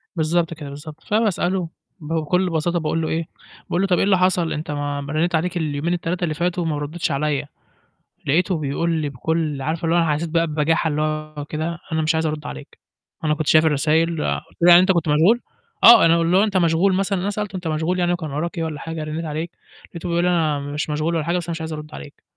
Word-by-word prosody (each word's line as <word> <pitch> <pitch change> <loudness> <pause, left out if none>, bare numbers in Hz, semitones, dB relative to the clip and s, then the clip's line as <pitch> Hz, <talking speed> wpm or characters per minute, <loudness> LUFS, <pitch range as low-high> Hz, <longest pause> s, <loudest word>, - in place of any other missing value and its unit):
بالضبط 165 +1 0
كده، 150 -3 -8
بالضبط. 150 +2 -10
فباسأله 190 -5 0 0.3
بكل 165 +3 0
بساطة 170 +1 0
باقول 165 +1 -1
له 160 - -1
إيه، 160 0 -2 0.4
باقول 175 - 0
له: 195 - +1
"طَب 180 -2 +2
إيه - - +2
اللي 195 -1 +4
حصل؟ 180 -2 +1
أنت 150 0 -4
ما 145 -1 -3
ما 140 +1 -6
رنّيت 170 +3 +1
عليك 175 +3 -1
اليومين 155 +1 -1
ال3 175 +1 -2
اللي 160 -3 0
فاتوا 175 +2 -1
وما 160 -3 -1
ردّيتش 155 +3 -3
عليّا." 145 0 -1 0.8
لقيته 175 +4 +2
بيقول 155 +3 -1
لي 155 -3 -1
بكل 150 +1 -2
عارفة 160 +4 -2
اللي 165 +1 +2
هو - - +4
أنا 165 -3 +2
حسّيت 160 +3 -2
بقى 165 +1 +1
ببجاحة 155 +2 +1
اللي 150 0 -1
هو 155 -1 -3
كده. 160 +3 -4
"أنا 160 0 +1
مش 160 +1 +1
عايز 160 0 0
أرُد 155 -1 -3
عليك، 65 0 -10 0.4
أنا 155 -1 +2
كنت 155 -1 -3
شايف 155 0 +5
الرسايل." 155 +2 +2 0.4
قُلت - - -25
له: 175 - +6
"يعني 175 0 +10
أنت 185 +1 +3
كنت 170 -3 0
مشغول؟" 170 +11 +4 0.4
آه. 235 - +9
أنا 165 0 +4
اللي 170 +2 +3
هو 200 - +5
أنت 205 -3 0
مشغول 175 +2 +3
مثلًا؟ 195 0 0
أنا 195 - -1
سألته: 205 -1 -4
"أنت 180 -2 -4
مشغول 160 +4 -1
يعني 175 0 +2
وكان 160 -4 -4
وراك 170 +5 -3
إيه؟ 165 - -1
والّا 155 -2 -4
حاجة، 165 -1 -5
رنّيت 155 +2 -4
عليك." 160 +2 -4 0.4
لقيته 175 0 -6
بيقول 170 0 +1
لي: 180 - +2
"أنا 160 -4 +1
مش 145 +2 -4
مشغول 155 +3 -1
ولا 160 - 0
حاجة، 170 +3 0
بس 175 - -3
أنا - - -3
مش 165 0 -4
عايز 160 0 -4
أرُد 150 0 -8
عليك." 145 - -11
165 Hz, 240 wpm, -21 LUFS, 155-175 Hz, 0.8 s, يعني